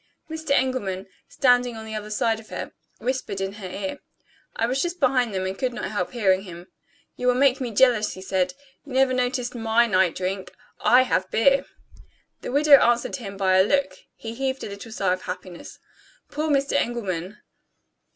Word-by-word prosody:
Mr. 320 Hz, -1 st, -6 dB
Engelman, 255 Hz, -9 st, 0 dB, 0.2 s
standing 245 Hz, -2 st, +2 dB
on 220 Hz, -, -8 dB
the 220 Hz, -, -7 dB
other 210 Hz, -1 st, -5 dB
side 220 Hz, +1 st, 0 dB
of 220 Hz, -, -15 dB
her, -, -, -6 dB, 0.3 s
whispered 255 Hz, -6 st, -3 dB
in 195 Hz, 0 st, -3 dB
her 200 Hz, -3 st, -8 dB
ear. 285 Hz, +10 st, -5 dB, 0.6 s
I 230 Hz, -, +1 dB
was 260 Hz, +3 st, 0 dB
just 350 Hz, 0 st, -3 dB
behind 255 Hz, -4 st, +2 dB
them, 190 Hz, -1 st, -2 dB
and 190 Hz, +1 st, -3 dB
could 250 Hz, +3 st, -2 dB
not -, -, -4 dB
help 190 Hz, -4 st, -2 dB
hearing 195 Hz, -5 st, +2 dB
him. 175 Hz, -2 st, -11 dB, 0.5 s
"You 250 Hz, -, -2 dB
will 250 Hz, -, +4 dB
make 270 Hz, 0 st, +3 dB
me 250 Hz, -, -2 dB
jealous," 230 Hz, -1 st, +3 dB
he 185 Hz, -, -10 dB
said; 190 Hz, +5 st, 0 dB, 0.3 s
"you 280 Hz, -, -10 dB
never 260 Hz, 0 st, +3 dB
noticed 250 Hz, -1 st, -1 dB
my 230 Hz, 0 st, +2 dB
night 190 Hz, -5 st, +2 dB
drink 185 Hz, +1 st, -4 dB, 0.2 s
I 255 Hz, +1 st, +5 dB
have 185 Hz, -7 st, 0 dB
beer." 275 Hz, +5 st, +3 dB, 0.8 s
The -, -, -5 dB
widow 285 Hz, +1 st, +7 dB
answered 240 Hz, 0 st, +2 dB
him 200 Hz, -6 st, -8 dB
by 190 Hz, -1 st, +3 dB
a -, -, +7 dB
look; 280 Hz, +6 st, +1 dB, 0.2 s
he 225 Hz, 0 st, -7 dB
heaved 265 Hz, +2 st, -2 dB
a -, -, -5 dB
little 200 Hz, +3 st, -9 dB
sigh 195 Hz, -4 st, 0 dB
of 185 Hz, -, -5 dB
happiness. 180 Hz, -1 st, -8 dB, 0.5 s
Poor 310 Hz, +2 st, -2 dB
Mr. 280 Hz, -1 st, +1 dB
Engelman! 210 Hz, -8 st, -2 dB
230 Hz, 190 wpm, -24 LUFS, 195-260 Hz, 0.8 s, widow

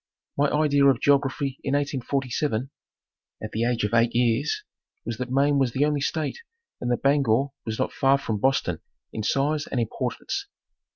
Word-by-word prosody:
My 145 Hz, +1 st, +3 dB
idea 145 Hz, -1 st, +3 dB
of 135 Hz, -3 st, +4 dB
geography 140 Hz, -1 st, +1 dB
in 135 Hz, 0 st, 0 dB
1847 135 Hz, -2 st, -1 dB, 0.7 s
at 110 Hz, -, -5 dB
the 115 Hz, +2 st, 0 dB
age 120 Hz, -2 st, 0 dB
of 105 Hz, +2 st, -1 dB
eight 115 Hz, 0 st, +3 dB
years 125 Hz, -, +1 dB, 0.4 s
was 115 Hz, -2 st, -4 dB
that 125 Hz, -1 st, -3 dB
Maine 140 Hz, +2 st, +3 dB
was 130 Hz, -3 st, +1 dB
the 140 Hz, +2 st, +2 dB
only 150 Hz, -1 st, 0 dB
state 155 Hz, -, -2 dB, 0.4 s
and 120 Hz, -, -3 dB
that 120 Hz, -, -1 dB
Bangor 140 Hz, -2 st, +3 dB, 0.2 s
was 110 Hz, -1 st, -2 dB
not -, -, -1 dB
far 135 Hz, 0 st, +3 dB
from 110 Hz, -6 st, -3 dB
Boston 115 Hz, -9 st, +1 dB, 0.3 s
in 110 Hz, -, -3 dB
size 145 Hz, +7 st, 0 dB
and 130 Hz, -, -2 dB
importance. 115 Hz, -, -3 dB
135 Hz, 170 wpm, -25 LUFS, 115-145 Hz, 0.7 s, of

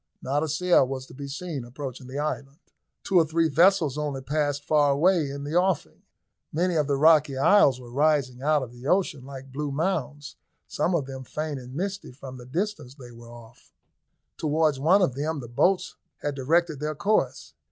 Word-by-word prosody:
Not 140 Hz, +3 st, 0 dB
a 160 Hz, -, -1 dB
sail 160 Hz, -2 st, +3 dB
was 130 Hz, 0 st, -5 dB
to -, -, -15 dB
be 140 Hz, +1 st, -7 dB
seen 150 Hz, -1 st, -5 dB
approaching 130 Hz, +1 st, -8 dB
the 130 Hz, +2 st, -7 dB
island. 145 Hz, -1 st, -3 dB, 0.5 s
Two 190 Hz, -, +2 dB
or -, -, +5 dB
three 165 Hz, +1 st, +2 dB
vessels 165 Hz, -3 st, +3 dB
only 145 Hz, -3 st, -3 dB
passed 145 Hz, 0 st, -1 dB
far 150 Hz, -2 st, +3 dB
away 165 Hz, 0 st, +2 dB
in 140 Hz, +1 st, -6 dB
the 145 Hz, +2 st, -5 dB
offing. 175 Hz, -, 0 dB, 0.5 s
Many 175 Hz, +3 st, 0 dB
other 145 Hz, -3 st, +1 dB
rocky 150 Hz, -2 st, +4 dB
isles 140 Hz, -3 st, +5 dB
were 120 Hz, -1 st, -12 dB
rising 140 Hz, -2 st, +1 dB
out 150 Hz, 0 st, +2 dB
of 120 Hz, -, -8 dB
the 125 Hz, +2 st, -10 dB
ocean 180 Hz, -6 st, +1 dB
like 135 Hz, 0 st, -10 dB
blue 145 Hz, +2 st, -3 dB
mounds, 150 Hz, -2 st, -3 dB, 0.3 s
some 170 Hz, +4 st, 0 dB
of 150 Hz, -5 st, 0 dB
them 135 Hz, -1 st, -8 dB
faint 150 Hz, +2 st, -4 dB
and 125 Hz, +1 st, -11 dB
misty 195 Hz, +1 st, -4 dB
from 130 Hz, 0 st, -10 dB
the 120 Hz, 0 st, -12 dB
distance 170 Hz, -3 st, -3 dB
they 125 Hz, -4 st, -12 dB
were 115 Hz, 0 st, -13 dB
off. 120 Hz, 0 st, -15 dB, 0.7 s
Towards 155 Hz, -2 st, +1 dB
one 180 Hz, +8 st, +4 dB
of 135 Hz, -, +1 dB
them 150 Hz, +3 st, -2 dB
the 120 Hz, -, -8 dB
boats 180 Hz, -, +1 dB, 0.3 s
had 145 Hz, -, -1 dB
directed 155 Hz, +3 st, +1 dB
their 150 Hz, +1 st, -3 dB
course. 210 Hz, +8 st, 0 dB
145 Hz, 190 wpm, -26 LUFS, 135-160 Hz, 0.7 s, or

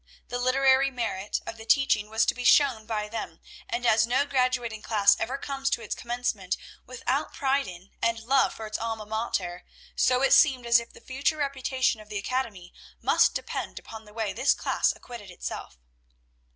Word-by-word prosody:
The 245 Hz, -, -3 dB
literary 265 Hz, +1 st, +4 dB
merit 225 Hz, -6 st, -3 dB
of -, -, -6 dB
the 225 Hz, -, -10 dB
teaching 215 Hz, -5 st, +3 dB
was 220 Hz, +1 st, +2 dB
to -, -, +2 dB
be 250 Hz, -, -6 dB
shown 245 Hz, -5 st, +4 dB
by 210 Hz, -2 st, -2 dB
them; 225 Hz, +2 st, -6 dB, 0.3 s
and 240 Hz, +1 st, -2 dB
as 220 Hz, -1 st, +4 dB
no 260 Hz, +4 st, +2 dB
graduating 250 Hz, -5 st, 0 dB
class 205 Hz, -3 st, +4 dB
ever 260 Hz, +4 st, -2 dB
comes 275 Hz, -1 st, -2 dB
to 235 Hz, -, -1 dB
its 215 Hz, -, -3 dB
commencement 235 Hz, -6 st, -2 dB, 0.3 s
without 255 Hz, +3 st, -2 dB
pride 275 Hz, -1 st, +1 dB
in, 180 Hz, +1 st, -11 dB
and 230 Hz, 0 st, +1 dB
love 265 Hz, +3 st, +3 dB
for 220 Hz, -, -7 dB
its 215 Hz, 0 st, -4 dB
alma 225 Hz, -1 st, -3 dB
mater, 205 Hz, -5 st, -3 dB, 0.3 s
so 255 Hz, +1 st, +3 dB
it -, -, +5 dB
seemed 260 Hz, -5 st, +5 dB
as 235 Hz, 0 st, +6 dB
if 235 Hz, -, -10 dB
the -, -, -16 dB
future 270 Hz, +5 st, -1 dB
reputation 265 Hz, -5 st, 0 dB
of 210 Hz, -, -16 dB
the 210 Hz, -, -4 dB
academy 205 Hz, -5 st, -3 dB, 0.3 s
must -, -, +3 dB
depend -, -, -4 dB
upon 220 Hz, -1 st, -9 dB
the 210 Hz, -, -15 dB
way 220 Hz, -3 st, -2 dB
this -, -, +2 dB
class -, -, +1 dB
acquitted 235 Hz, -5 st, -10 dB
itself. 175 Hz, -, -7 dB
235 Hz, 185 wpm, -27 LUFS, 215-260 Hz, 0.3 s, as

